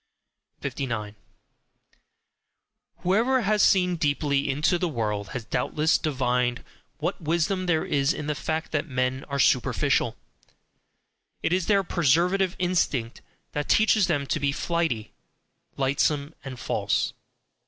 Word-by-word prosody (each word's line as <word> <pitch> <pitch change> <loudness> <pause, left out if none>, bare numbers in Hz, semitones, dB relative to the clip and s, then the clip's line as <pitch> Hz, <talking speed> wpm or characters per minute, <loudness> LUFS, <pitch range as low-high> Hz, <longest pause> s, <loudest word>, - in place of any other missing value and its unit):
59. 120 -6 -4 1.9
Whoever 230 +8 +3
has 210 -1 +2
seen 180 -3 +4
deeply 145 -2 0
into 150 +6 +1
the 180 - 0
world 105 -7 -2
has 125 -3 -5
doubtless 150 +7 +1
divined 125 -4 0 0.3
what 170 +4 -3
wisdom 170 +4 0
there 160 -3 +1
is 140 0 +1
in 150 - -4
the 150 - 0
fact 160 +2 -3
that 150 +1 -1
men 130 -1 -1
are 140 - -4
superficial. 125 -2 +2 1.3
It - - +1
is 185 -2 0
their 200 -2 +3
preservative 175 +3 +2
instinct 155 -10 0 0.3
which 145 0 -2
teaches 215 -3 +4
them 145 -5 0
to - - -1
be 140 -1 +1
flighty, 160 -8 -1 0.7
lightsome, 140 +2 0
and 130 -2 -7
false. - - 0
150 Hz, 120 wpm, -26 LUFS, 130-175 Hz, 1.9 s, seen